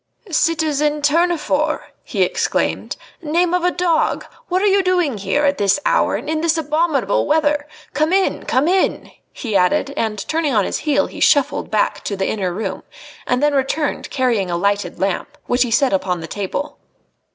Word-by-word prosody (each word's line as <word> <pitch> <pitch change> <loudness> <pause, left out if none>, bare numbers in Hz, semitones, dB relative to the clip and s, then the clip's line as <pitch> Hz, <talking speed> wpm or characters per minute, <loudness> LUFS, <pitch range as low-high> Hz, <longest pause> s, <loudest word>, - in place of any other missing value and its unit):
"Citizen 300 -2 +1
Tournefort!" 305 -1 +1
he - - 0
exclaimed. - - -1 0.3
"Name 340 +2 +1
of 360 -1 +1
a 360 - +4
dog! 350 -3 0 0.2
What 370 +2 0
are - - +3
you 395 -1 +4
doing 355 - +1
here 200 +10 0
at 285 0 +1
this 200 +6 +3
hour - - +2
and - - -5
in 310 0 -1
this 330 0 +1
abominable 305 -7 0
weather? 295 -1 +1 0.3
Come 310 +2 +1
in! 385 0 +1
Come 260 +4 +2
in!" 375 +2 +1 0.2
he 225 -6 -5
added, 190 +9 +2
and, 215 -7 -2
turning 315 -5 0
on 205 -3 +3
his - - -2
heel, 290 0 +3
he - - -9
shuffled 285 0 +2
back 215 -1 +1
into 200 - -4
the 190 - -1
inner 190 -4 -1
room, 190 0 -4 0.5
and 250 +3 +1
then 295 0 +3
returned 280 +2 -1
carrying 240 -8 0
a 170 - -1
lighted 200 -1 -1
lamp, 195 -2 -2
which 245 +1 0
he 245 - +3
set 255 +2 +2
upon 185 -2 0
the 165 - -6
table. 205 - -4
290 Hz, 180 wpm, -19 LUFS, 210-320 Hz, 0.5 s, a